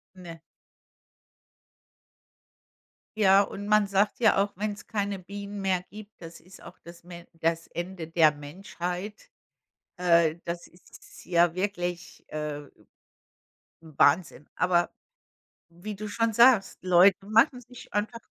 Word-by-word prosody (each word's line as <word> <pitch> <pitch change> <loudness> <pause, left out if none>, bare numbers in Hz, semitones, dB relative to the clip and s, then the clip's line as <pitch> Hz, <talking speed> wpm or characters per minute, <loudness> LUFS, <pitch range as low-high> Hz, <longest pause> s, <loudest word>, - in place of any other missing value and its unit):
Ne. 170 -3 -11 2.8
Ja, 195 -1 +6
und 205 0 -5
man 210 -1 +3
sagt 200 +3 0
ja 220 -5 +4
auch, 200 +1 0
wenn's 210 0 -4
keine 200 -2 -3
Bienen 200 +2 -8
mehr 190 -2 0
gibt, 210 +1 -12
das 165 0 -11
ist 185 +2 -17
auch - - -13
das 170 0 -14
Me 175 -1 -11
das 165 0 -1
Ende 175 -2 -7
der 165 -2 +4
Menschheit. 180 +6 -7 0.7
Äh, 170 -2 +3
das 170 0 -5
ist 175 - -17
ja 170 -1 +2
wirklich, 180 -2 -4
äh 150 -1 -5 1.2
Wahnsinn. 150 -1 +1
Aber 175 -1 +1 0.8
wie 180 +5 -8
du 215 +1 -6
schon 230 +2 -1
sagst, 235 -3 +4
Leute 185 +1 +5
machen 225 +4 +3
sich 250 0 -15
einfach 220 +3 -2
185 Hz, 120 wpm, -27 LUFS, 170-205 Hz, 2.8 s, Ja